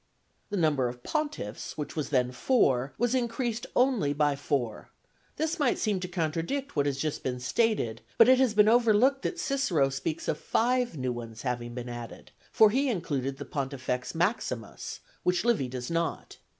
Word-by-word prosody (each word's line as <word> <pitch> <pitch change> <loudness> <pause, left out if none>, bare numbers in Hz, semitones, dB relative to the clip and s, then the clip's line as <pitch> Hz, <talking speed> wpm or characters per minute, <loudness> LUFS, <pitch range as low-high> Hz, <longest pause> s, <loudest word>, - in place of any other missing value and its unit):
The 205 - -2
number 150 -7 +2
of 120 0 -7
pontiffs, 125 - -3
which 150 - -5
was 150 -4 -2
then 125 -3 +2
four, 135 - +2
was 240 +1 +1
increased 240 -2 -1
only 245 - +3
by 145 -1 +2
four: 135 -6 -2 0.5
this 320 +2 -1
might 280 -4 +2
seem 210 -4 0
to 180 - -4
contradict 175 - -2
what 145 0 +2
has 140 -2 -1
just 150 +1 -2
been 125 -1 -3
stated, 125 - 0 0.2
but 230 - +8
it 255 0 +6
has 255 -5 +3
been 210 0 +6
overlooked 240 +4 +4
that 355 - -3
Cicero 200 - +1
speaks 150 +4 -3
of 150 - -1
five 245 -5 +1
new 130 -1 -1
ones 115 -2 -8
having 120 -2 -3
been 125 -1 -5
added, 120 -1 -8 0.2
for 215 -1 +6
he 270 +4 +2
included 140 - -2
the - - -7
Pontifex 130 -1 -3
Maximus, 160 - -2 0.2
which 180 +3 +1
Livy 230 - +2
does 125 +1 -5
not. 165 0 -2
160 Hz, 175 wpm, -28 LUFS, -, 0.5 s, but